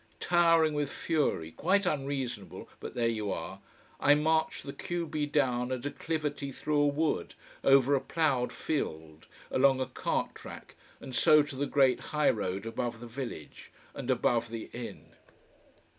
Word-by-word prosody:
Towering 165 -3 +4
with 145 -1 -1
fury 145 - -1
quite 190 - +1
unreasonable, 135 - -3
but - - -8
there 120 -1 +1
you 110 -3 -1
are - - -5 0.4
I 145 - +6
marched 160 +1 +1
the 140 - -6
q 175 -1 -3
b 150 -1 -2
down 130 -4 +1
a 130 - 0
declivity 145 +1 -3
through 150 +2 0
a 145 - +4
wood, 150 +2 -1 0.3
over 135 0 +5
a 135 - +3
ploughed 135 -7 +1
field, 80 - -4 0.2
along 135 0 +4
a 130 - 0
cart - - -2
track, - - -11 0.3
and 130 - -9
so 150 +3 +6
to 145 -1 -8
the 140 +2 -1
great 135 -3 +3
high 150 -1 +2
road 100 -1 -3
above 115 0 -3
the 120 - -8
village 120 - -7 0.2
and - - -6
above 115 -1 +2
the 115 -1 -7
inn. 120 0 -8
140 Hz, 160 wpm, -30 LUFS, 120-150 Hz, 0.4 s, I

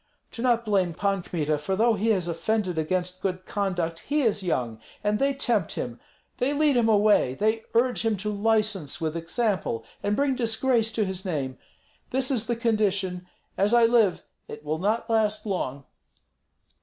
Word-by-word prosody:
"Do 230 - -7
not 235 -2 +2
blame 190 -5 +1
Pan 200 0 0
Kmita, 155 -4 -1
for 170 +6 -2
though 230 +3 +3
he 215 +1 -1
has 190 -6 +2
offended 185 0 -1
against 180 +3 -2
good 185 -1 -2
conduct 175 -5 -2
he 295 +1 0
is 215 -4 +1
young; 125 -11 -2 0.2
and 210 0 +1
they 275 0 +3
tempt 235 - 0
him, 120 -1 -5 0.4
they 260 +4 +1
lead 295 -1 +3
him 235 -2 +3
away, 205 -11 +4
they 220 +5 +1
urge 245 +1 +2
him 225 -2 +1
to 210 +3 -3
license 210 -6 0
with 160 0 -2
example, 175 - -1 0.2
and 205 +1 0
bring 280 +1 +2
disgrace 230 -1 +1
to 215 -1 +1
his 190 -1 -4
name. 135 -8 -3 0.5
This 260 +1 0
is 235 -4 0
the 240 - 0
condition; 200 -6 0 0.3
as 205 +4 +3
I 235 -1 +6
live, 225 -5 +3 0.2
it 150 0 -10
will 155 +1 -2
not 215 +5 0
last 220 -2 +1
long." 140 -9 -3
205 Hz, 175 wpm, -26 LUFS, 180-230 Hz, 0.5 s, I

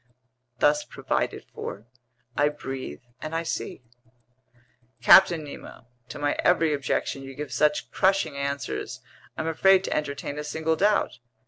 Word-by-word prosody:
Thus 150 +4 +3
provided - - -2
for, 105 - -6 0.5
I 145 0 +3
breathe 135 - -7 0.2
and 155 +1 -4
I 165 - 0
see." 150 - -4 1.2
"Captain 170 -4 +7
Nemo, 140 -4 -10 0.2
to - - -7
my 145 0 0
every 165 -3 +4
objection 140 -1 -1
you 135 0 -9
give 145 -3 -6
such 150 +4 +1
crushing 195 -5 +2
answers, 140 - -3 0.4
I'm 160 - -2
afraid 190 +4 +4
to - - -2
entertain 145 0 -3
a - - -3
single 160 +2 -1
doubt. 205 - +1
150 Hz, 135 wpm, -26 LUFS, 140-165 Hz, 1.2 s, Captain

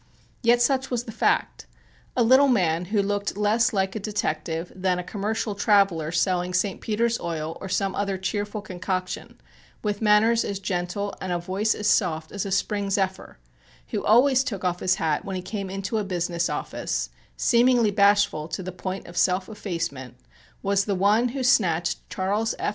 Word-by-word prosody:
Yet 240 0 +4
such 265 +1 +1
was 240 -2 -1
the 230 - -8
fact. 225 - 0 0.5
A 245 - +4
little 260 +4 +6
man 180 -9 +2
who 200 +2 +1
looked 205 0 -2
less 210 +3 +2
like 195 -2 -1
a - - -2
detective 165 -5 -3
than 185 -1 0
a 180 - -3
commercial 210 +3 -2
traveller 195 -6 +2
selling 180 +1 0
St. 190 +1 0
Peter's 230 +2 0
Oil 165 -1 -4
or 190 - -6
some 195 +1 0
other 200 -1 -1
cheerful 205 +2 -3
concoction, 185 -1 -4 0.4
with 205 0 -2
manners 220 +2 +4
as 200 - -3
gentle 190 +1 -3
and 185 - -3
a 175 - +1
voice 190 +5 0
as 210 - -2
soft 160 -6 +1
as 200 -1 -3
a - - -5
spring 200 +1 0
zephyr, 190 -1 -2 0.5
who - - -2
always 260 +4 +5
took 200 -9 -4
off 180 -1 0
his 185 - +2
hat 155 -2 -1
when 195 - -5
he 185 - -3
came 195 0 -5
into 195 +3 -2
a - - -1
business 175 -2 -1
office, - - -3 0.3
seemingly 240 -2 +4
bashful 200 -6 +3
to 185 - -5
the 185 - -5
point 185 +1 -5
of 175 - -11
self 185 +1 +2
effacement, 165 - -5 0.5
was 200 0 +2
the 200 - 0
one 205 +6 +3
who 260 +2 -3
snatched 175 -9 +2
Charles 205 +4 -1
F. - - -1
195 Hz, 180 wpm, -25 LUFS, 180-215 Hz, 0.5 s, little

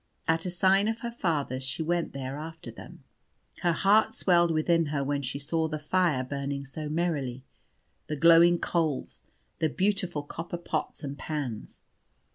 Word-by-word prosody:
At 165 +2 +1
a - - -1
sign 190 +3 +3
of 225 0 -2
her 235 - -3
father's 150 - -1
she 130 +4 -2
went 170 +1 0
there 135 0 -5
after 160 -4 -8
them. - - -12 0.6
Her 175 - +3
heart 210 +6 +3
swelled 175 -2 +4
within 165 +1 +2
her 145 -1 -1
when 140 +1 -1
she 135 +1 -3
saw 160 +3 -1
the 155 -1 -3
fire 155 -3 +1
burning 140 +1 -4
so 150 +3 -6
merrily, 150 -6 -1 0.6
the 150 - -2
glowing 170 +3 +6
coals, 160 -5 -2 0.3
the 160 - +2
beautiful 185 -3 0
copper 165 +4 -6
pots 170 - -4
and 140 0 -5
pans. 140 -8 -5
160 Hz, 160 wpm, -28 LUFS, 140-175 Hz, 0.6 s, glowing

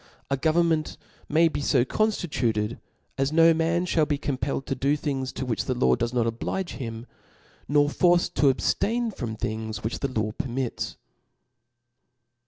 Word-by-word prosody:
A - - +4
government 160 +1 +1 0.3
may 165 +3 +5
be 155 - -3
fo 130 -3 +3
conftituted, 125 - 0 0.4
as 135 +1 +1
no 165 +1 +6
man 165 +2 +1
fhall 160 -4 +2
be 145 - 0
compelled 135 -1 -2
to - - -2
do 140 +3 +1
things 135 -3 -2
to 130 - -4
which 115 -5 -1
the - - -1
law 65 0 +3
does 120 0 -2
not 120 -2 +1
oblige 120 +11 -2
him, 115 -3 -6 0.6
nor 145 0 +4
forced 175 +3 +3
td 140 - +4
ab 130 - +1
ftain 230 0 0
from 115 -4 -4
things 110 0 -4
which 110 +2 -3
the 140 - 0
law 110 -3 -1
permits." 125 +2 -3
140 Hz, 165 wpm, -26 LUFS, 120-165 Hz, 0.6 s, no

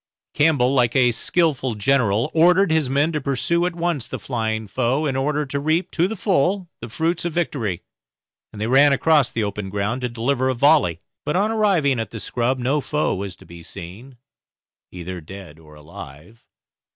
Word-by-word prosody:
Campbell, 145 -4 +3
like 120 -3 +2
a 125 -2 +4
skilful 135 0 0
general, 115 +1 +1
ordered 180 +3 +4
his 160 -5 +1
men 145 +4 +1
to 150 -2 -2
pursue 140 +6 0
at 180 - -5
once 170 -7 -1
the - - -5
flying 110 -3 -3
foe, 130 +8 0
in 135 -3 -1
order 145 +2 0
to 140 +1 -3
reap 155 +5 0
to 175 +1 +1
the 220 - -5
full 185 -1 0
the 120 - -8
fruits 165 +8 -1
of 170 -2 -3
victory, 125 - -2 0.7
and 105 - -11
they 110 - -1
ran 135 +4 +5
across 145 -2 +3
the 110 - -2
open 100 -1 -4
ground 105 +5 -2
to 125 - -2
deliver 125 +3 -1
a 130 - 0
volley; 125 - +3 0.2
but 150 - -2
on 205 +4 +1
arriving 185 - +2
at 110 -3 -3
the 110 - -8
scrub 125 +4 -1
no 130 +4 0
foe 150 +2 -1
was 100 -1 -5
to - - -18
be 85 0 -12
seen, 95 - -11 0.7
either 90 0 -7
dead 90 -2 -11
or 75 -1 -16
alive. 75 +7 -13
130 Hz, 190 wpm, -21 LUFS, 110-155 Hz, 0.7 s, ran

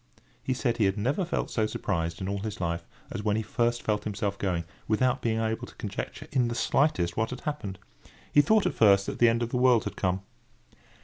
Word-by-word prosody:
He 130 - -1
said 120 -2 0
he 110 - +3
had 95 +1 +1
never 130 - 0
felt 175 - -2
so 110 -2 +1
surprised 85 -5 -2
in 95 - -2
all 100 +1 -2
his 110 +1 -5
life, 85 -1 -2 0.2
as - - -3
when 105 -1 +1
he 110 - 0
first 120 +2 0
felt 105 -1 0
himself 100 -1 -2
going, 90 -4 0 0.2
without 125 +4 +2
being 115 -1 0
able 110 0 -1
to - - -15
conjecture - - -5
in 125 -2 +2
the 120 - -3
slightest 90 - +1
what 110 +1 0
had 125 -1 -6
happened. 125 -11 -4 0.6
He 145 - +8
thought 215 +8 +3
at - - +1
first 100 -3 +5
that - - -5
the 120 - +7
end 115 +1 +1
of 115 - -2
the 125 - -1
world 125 -2 +5
had - - -5
come. 95 0 -1
110 Hz, 230 wpm, -28 LUFS, 100-120 Hz, 0.6 s, He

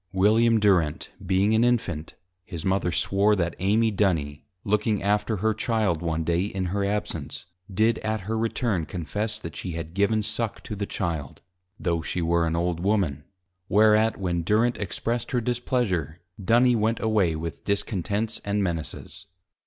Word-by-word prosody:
William 110 +4 +4
Durent 90 -8 +2
being 95 +3 +2
an 110 +1 +4
Infant, 95 -10 0 0.3
his 85 -4 -7
Mother 95 -2 +1
Swore, 100 +5 +2
That 85 -3 -1
Amy 110 +4 +2
Duny 80 -8 0 0.2
looking 105 0 0
after 105 +2 +1
her 110 +3 +1
Child 110 -6 0
one 80 -1 -1
Day 85 +3 +1
in 95 -2 -3
her 100 0 0
absence, 100 -3 -3 0.3
did 110 +4 +2
at 110 -1 -2
her 110 +4 -3
return 110 - -1
confess, 105 +6 -3
that 85 -8 -8
she 90 +2 -5
had 80 0 -6
given 100 +3 +2
suck 115 +1 -3
to 105 - -6
the 100 0 -3
Child: 80 -7 -4 0.4
(tho' 85 -3 0
she 85 - -3
were 85 0 +2
an 80 - -1
Old 85 0 -1
Woman:) 90 -7 0 0.4
Whereat, 110 +1 +4
when 90 -3 -1
Durent 110 +6 +2
expressed 115 +4 -2
her 125 - +3
displeasure, 110 - -1 0.2
Duny 120 +5 +4
went 110 +1 +1
away 105 -7 +2
with 80 +1 -6
Discontents 100 +2 -2
and 100 0 0
Menaces. 85 +2 -5
100 Hz, 160 wpm, -25 LUFS, 85-110 Hz, 0.4 s, William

